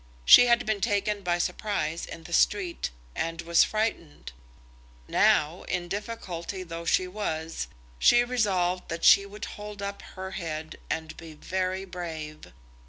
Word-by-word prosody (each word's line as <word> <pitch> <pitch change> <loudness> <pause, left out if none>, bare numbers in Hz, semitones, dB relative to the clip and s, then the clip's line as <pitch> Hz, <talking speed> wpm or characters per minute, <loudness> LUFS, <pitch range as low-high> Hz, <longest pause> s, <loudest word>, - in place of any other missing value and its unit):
She 245 - +9
had 240 0 +3
been 215 -2 -1
taken 205 +1 0
by 175 -2 0
surprise 175 -3 -2
in 165 - -9
the 170 - -9
street, 185 -1 +1 0.3
and 165 0 -3
was 170 0 +5
frightened. 215 - -3 0.8
Now, 155 +4 +3
in 180 -1 -2
difficulty 195 -3 -5
though 170 -1 -7
she 185 +2 +2
was, 165 -5 -4 0.3
she 240 0 +6
resolved 190 -7 0
that 165 0 -4
she 200 0 +7
would 205 +1 -7
hold 210 -1 -8
up 200 0 -5 0.2
her 190 0 -5
head 160 -3 -5
and 160 -1 -3
be 160 -2 -10
very 185 +3 -2
brave. 160 -4 -7
180 Hz, 145 wpm, -27 LUFS, 165-205 Hz, 0.8 s, She